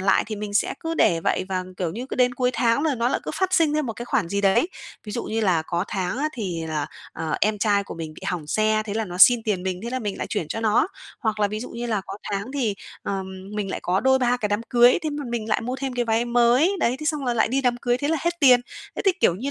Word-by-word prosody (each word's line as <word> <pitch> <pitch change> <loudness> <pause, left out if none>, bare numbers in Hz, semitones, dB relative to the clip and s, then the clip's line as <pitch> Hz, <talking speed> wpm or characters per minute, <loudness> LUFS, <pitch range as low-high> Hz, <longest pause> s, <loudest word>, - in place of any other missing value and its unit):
lại 195 +1 +3
thì 215 -1 -5
mình 205 0 -5
sẽ - - +2
cứ 330 0 -3
để 170 - +3
vậy 185 - 0
và, 185 -1 -2
kiểu 175 -3 -2
như, 245 +5 -5
cứ - - -5
đến 250 -1 +3
cuối 250 0 +1
tháng 235 +3 +2
là 310 -3 +1
nó 240 0 +1
lại - - -1
cứ - - -4
phát 375 -1 0
sinh 325 -4 +4
thêm 305 -3 0
một 225 - -2
cái 240 - -7
khoản 240 -8 0
gì 200 +2 -1
đấy. 200 - +3 0.4
Ví 210 - -7
dụ 235 - -3
như 225 +1 -2
là 180 -6 +2
có 170 +3 -2
tháng 190 +5 -2
á 305 +2 +1
thì 175 -8 -3
là, 155 -2 -2 0.3
ờ, 160 -1 -3
em 210 0 +2
trai 200 -1 +2
của - - -8
mình 160 -2 -7
bị - - -13
hỏng 165 -4 -3
xe, 215 +4 +2
thế 205 - -4
là 225 0 0
nó 180 -2 -7
xin 240 +2 +8
tiền 200 -5 -1
mình, 185 -1 -3
thế 235 - -4
là 255 - -1
mình 205 -4 -4
lại - - -3
chuyển 170 -8 -3
cho 225 - -3
nó, 220 +5 +3 0.3
hoặc 215 -4 -1
là 205 - +3
ví 215 +1 -4
dụ 250 - -7
như 240 +1 -5
là 215 -3 0
có 195 - -6 0.2
tháng 200 +6 -3
thì, 230 -7 0 0.3
ờ, 195 -1 -2 0.3
mình 200 -2 -2
lại - - -4
có 185 +2 +1
đôi 265 +2 +4
ba 250 -1 +2
cái 215 -4 -2
đám 205 +1 0
cưới, 240 0 +6
thế 310 - -1
m 290 - -4
mình 225 -2 -3
lại - - +1
mua 250 +3 -3
thêm 265 -1 -3
cái 245 -1 0
váy 225 +1 +1
mới. 240 +8 +4
Đấy, 245 +2 +2
thế 305 - -4
xong 300 -3 0
là 245 -1 0
lại 220 - +2
đi 270 +3 +1
đám 245 -2 +1
cưới, 245 0 0
thế 290 - -1
là 325 - +2
hết 345 0 -2
tiền, 255 -3 +7 0.4
thế - - -2
thì 385 - +5
kiểu 170 - +4
như 255 +9 -4
225 Hz, 305 wpm, -24 LUFS, 200-250 Hz, 0.4 s, xin